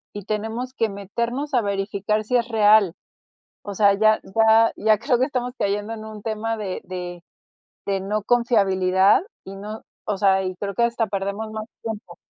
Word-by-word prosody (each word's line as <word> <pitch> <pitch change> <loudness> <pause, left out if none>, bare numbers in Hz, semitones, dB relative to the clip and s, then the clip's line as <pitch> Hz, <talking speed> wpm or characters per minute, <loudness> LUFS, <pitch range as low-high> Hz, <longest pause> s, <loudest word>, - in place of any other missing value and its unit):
y 205 - -7
tenemos 225 +5 -3
que 225 -3 +1
meternos 235 +8 -4
a 245 - +4
verificar 200 +1 -1
si 250 +3 +2
es 235 - -1
real. 210 -5 +5 0.7
O 200 - -5
sea, 200 0 +5
ya 215 +1 +4 0.2
ya 225 0 +5
ya 215 0 +3
creo 250 -1 +1
que 255 - +3
estamos 250 -3 -3
cayendo 205 +2 -1
en 220 -1 -8
un 215 -1 -9
tema 225 +1 -2
de 200 -4 -4
de 175 -1 -6 0.6
de 195 -1 0
no 205 +1 -2
confiabilidad 195 -5 +3 0.2
y 195 - -8
no 210 +3 -7 0.2
o 205 -2 -1
sea, 190 -1 +3
y 185 0 -3
creo 200 0 -4
que 235 - +2
hasta 235 -1 +1
perdemos 200 +2 -3
más 215 0 -5 0.2
tiempo. 215 -6 -6
215 Hz, 180 wpm, -23 LUFS, 195-225 Hz, 0.7 s, real